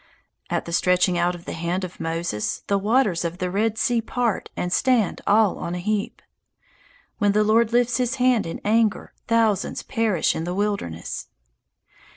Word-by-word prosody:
At - - -1
the 170 - -6
stretching 180 0 +2
out 175 +1 +1
of 175 - -12
the - - -5
hand 170 +3 -2
of 180 -1 -7
Moses 165 -9 -3
the 200 -1 +1
waters 210 -4 +2
of 170 +1 -3
the 180 -1 -2
Red 215 +3 0
Sea 235 +1 +1
part 235 -1 -2
and 180 0 -1
stand 240 -5 +2
all 210 -1 +3
on 170 - -4
a - - -3
heap. 205 +3 -2 1.0
When 205 -2 +3
the 210 +1 +3
Lord 220 +2 +3
lifts 245 0 +2
his 250 0 0
hand 250 -6 +2
in 165 - -5
anger, 220 0 +1
thousands 225 -3 +1
perish 220 -7 0
in 160 - -3
the 175 +2 -3
wilderness. 200 - -3
205 Hz, 175 wpm, -23 LUFS, 175-225 Hz, 1.0 s, all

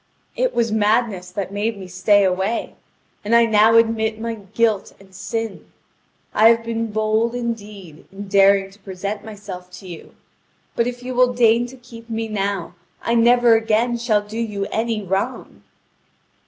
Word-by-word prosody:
It - - 0
was 230 -2 +1
madness 215 -3 +1
that 190 +1 -5
made 210 +2 -2
me 190 - -8
stay 185 +3 +3
away, 190 +4 -1 0.5
and 215 +3 +2
I 235 0 +6
now 220 0 +4
admit 225 -1 +1
my 230 0 -3
guilt 210 0 -1
and 195 -1 -19
sin. 225 +2 -5 0.6
I 220 +1 +6
have 230 0 +3
been 230 0 -3
bold, 220 +2 0
indeed, 210 -9 -6
in 200 +1 -8
daring 195 0 +4
to 200 - -20
present 200 +2 -5
myself 200 -4 -9
to 185 +1 -11
you; 170 -3 -11 0.6
but 235 - +1
if 245 0 -6
you 255 +1 -5
will 250 0 +3
deign 235 0 +3
to 260 +2 -13
keep 235 -2 -14
me 225 0 -3
now, 200 -4 -3 0.3
I 230 - 0
never 240 0 +5
again 225 +2 +1
shall 225 -3 +1
do 215 +2 -7
you 210 -4 -2
any 225 -1 -1
wrong." 190 +1 -3
220 Hz, 165 wpm, -20 LUFS, 200-230 Hz, 0.6 s, I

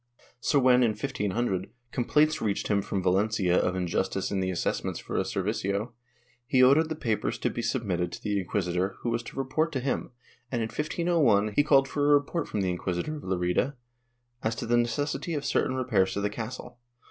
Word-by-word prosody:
So 145 - +1
when, 125 -2 +5
in 115 -3 +3
1500, 105 -4 -2 0.2
complaints 150 +5 +2
reached 100 -3 -1
him 100 -1 +3
from 95 -1 -3
Valencia 95 0 +2
of 90 - +2
injustice 95 +1 -1
in 100 - 0
the 95 0 0
assessments 90 - -2
for - - -6
a - - +3
servicio, 100 +4 -2 0.6
he 130 -2 +4
ordered 150 +5 +5
the 160 - -2
papers 115 -8 -1
to - - -1
be 120 - -3
submitted 95 -9 -1
to - - -8
the 105 -2 0
inquisitor 90 0 -1
who 120 - -1
was 115 0 0
to - - -11
report 145 +5 0
to 135 - 0
him, 130 +1 -2 0.4
and, 120 -3 0
in 110 - -3
1501, 150 - +1
he 145 - +5
called 135 -2 +4
for 145 +1 -2
a 145 - +7
report 145 +3 0
from 105 - -2
the 95 -1 0
inquisitor 90 - -2
of - - -10
Lerida 95 +9 0 0.7
as 110 0 -1
to - - -4
the 120 - +2
necessity 145 +7 0
of 145 - -3
certain 130 - +1
repairs 115 -8 +1
to 100 - -2
the 105 0 0
castle. 120 +2 -7
115 Hz, 195 wpm, -28 LUFS, 95-135 Hz, 0.7 s, a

